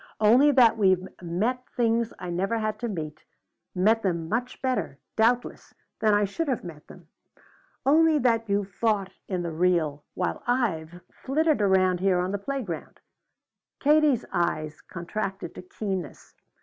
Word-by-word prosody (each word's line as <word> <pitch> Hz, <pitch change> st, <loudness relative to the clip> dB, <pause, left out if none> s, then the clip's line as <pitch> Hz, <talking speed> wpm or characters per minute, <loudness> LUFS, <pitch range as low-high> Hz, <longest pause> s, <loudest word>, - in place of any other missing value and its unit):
Only 240 Hz, +7 st, +6 dB
that 235 Hz, -4 st, +5 dB
you've 185 Hz, -1 st, +3 dB
met 210 Hz, +9 st, -1 dB
things 230 Hz, -1 st, +1 dB
I 180 Hz, -, -6 dB
never 195 Hz, +6 st, 0 dB
had 215 Hz, -1 st, -2 dB
to 240 Hz, -, -2 dB
meet, 155 Hz, -7 st, -5 dB, 0.6 s
met 215 Hz, +5 st, +3 dB
them 170 Hz, -5 st, -1 dB
much 240 Hz, +6 st, -2 dB
better, 205 Hz, -, -1 dB, 0.2 s
doubtless, 240 Hz, +2 st, 0 dB, 0.2 s
than 215 Hz, -1 st, +3 dB
I 205 Hz, 0 st, +3 dB
should 295 Hz, +12 st, -3 dB
have 260 Hz, -5 st, -1 dB
met 160 Hz, -4 st, -10 dB
them. 175 Hz, -3 st, -15 dB, 0.8 s
Only 315 Hz, +3 st, +5 dB
that 230 Hz, -4 st, +1 dB
you've 200 Hz, -1 st, 0 dB
fought 200 Hz, -2 st, 0 dB
in 180 Hz, -3 st, -2 dB
the 170 Hz, -, -3 dB
real, 160 Hz, -4 st, +1 dB
while 180 Hz, -, -2 dB
I've 180 Hz, -9 st, -1 dB
flitted 305 Hz, -1 st, 0 dB
around 185 Hz, -2 st, +3 dB
here 190 Hz, -1 st, +2 dB
on 180 Hz, +1 st, -1 dB
the 200 Hz, -, -2 dB
playground." 205 Hz, -, -5 dB, 0.8 s
Katie's 295 Hz, -3 st, +3 dB
eyes 155 Hz, -4 st, -1 dB
contracted 195 Hz, +3 st, -5 dB
to -, -, -9 dB
keenness. 185 Hz, -3 st, -6 dB
200 Hz, 150 wpm, -26 LUFS, 180-235 Hz, 0.8 s, Only